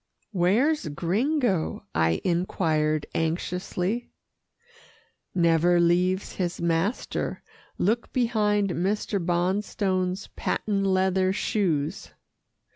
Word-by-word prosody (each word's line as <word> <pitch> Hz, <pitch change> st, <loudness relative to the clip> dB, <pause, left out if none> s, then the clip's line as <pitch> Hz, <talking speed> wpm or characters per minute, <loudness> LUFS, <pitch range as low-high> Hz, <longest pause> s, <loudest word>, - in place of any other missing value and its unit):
"Where's 215 Hz, -, +2 dB
Gringo?" 195 Hz, -, 0 dB
I 80 Hz, 0 st, +1 dB
inquired 160 Hz, -4 st, 0 dB
anxiously. 180 Hz, +6 st, -2 dB, 1.3 s
"Never 170 Hz, 0 st, +4 dB
leaves 180 Hz, +3 st, +2 dB
his 180 Hz, -2 st, -2 dB
master 170 Hz, +7 st, -1 dB, 0.3 s
look 225 Hz, +5 st, 0 dB
behind 210 Hz, -5 st, +1 dB
Mr. 195 Hz, +1 st, -1 dB
Bonstone's 185 Hz, +1 st, 0 dB
patent 200 Hz, -2 st, -1 dB
leather 190 Hz, 0 st, +2 dB
shoes." 175 Hz, -8 st, -1 dB
185 Hz, 75 wpm, -26 LUFS, 170-205 Hz, 1.3 s, Never